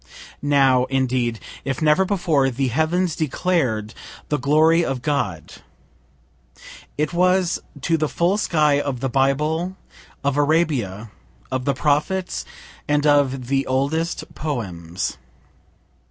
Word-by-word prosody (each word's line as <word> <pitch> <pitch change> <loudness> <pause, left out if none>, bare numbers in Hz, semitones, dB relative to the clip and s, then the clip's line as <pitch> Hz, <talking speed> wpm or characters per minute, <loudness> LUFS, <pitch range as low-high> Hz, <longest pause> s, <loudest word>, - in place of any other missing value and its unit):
Now, 135 -3 +3
indeed, 130 -3 0 0.2
if 135 -1 -3
never 155 +4 +3
before, 170 -9 +1
the 130 +1 -1
heavens 160 +5 0
declared 130 - -1 0.4
the 150 - 0
glory 155 +5 +4
of 135 -5 -3
God. 145 -1 -2 1.4
It 150 +3 -1
was 180 0 +2 0.2
to 165 +2 +1
the 155 -1 0
full 180 +5 +1
sky 150 -7 +2
of 135 -4 -3
the 135 +1 -1
Bible, 150 +8 0 0.5
of 140 0 0
Arabia, 140 - 0 0.4
of 130 -1 -2
the 140 - +1
prophets, 150 +7 0 0.4
and 145 0 +1
of 140 -3 +3
the 135 +2 0
oldest 145 +6 -1
poems. 95 - -4
145 Hz, 115 wpm, -22 LUFS, 130-160 Hz, 1.4 s, glory